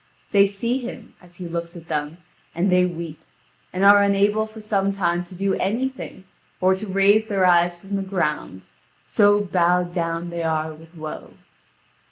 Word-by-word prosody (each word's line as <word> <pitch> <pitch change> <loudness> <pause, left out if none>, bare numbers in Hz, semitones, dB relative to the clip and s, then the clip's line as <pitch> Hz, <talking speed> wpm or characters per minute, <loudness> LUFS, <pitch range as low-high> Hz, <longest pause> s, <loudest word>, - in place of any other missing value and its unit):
They 200 -1 +5
see 230 +6 -2
him, 245 -1 -8
as 175 -1 -19
he 180 -1 -7
looks 170 +1 -5
at 165 -1 -13
them, 150 0 -3 0.4
and 180 +3 +1
they 180 0 +4
weep, 165 -3 -7 0.5
and 185 +2 0
are 205 0 +8
unable 200 +2 +2
for 220 0 -12
some 200 -2 0
time 175 -3 0
to 180 - -13
do 195 +1 0
anything 235 0 -3 0.4
or 185 +1 +4
to 195 +3 -5
raise 200 +3 +3
their 195 -3 +1
eyes 175 -1 +4
from 195 +2 -5
the 195 - -1
ground, 150 - -2 0.4
so 205 -1 +4
bowed 180 -2 +1
down 170 0 -2
they 170 0 -4
are 160 -1 -1
with 165 +2 -16
woe. 155 -1 -8
185 Hz, 175 wpm, -22 LUFS, 170-200 Hz, 0.5 s, are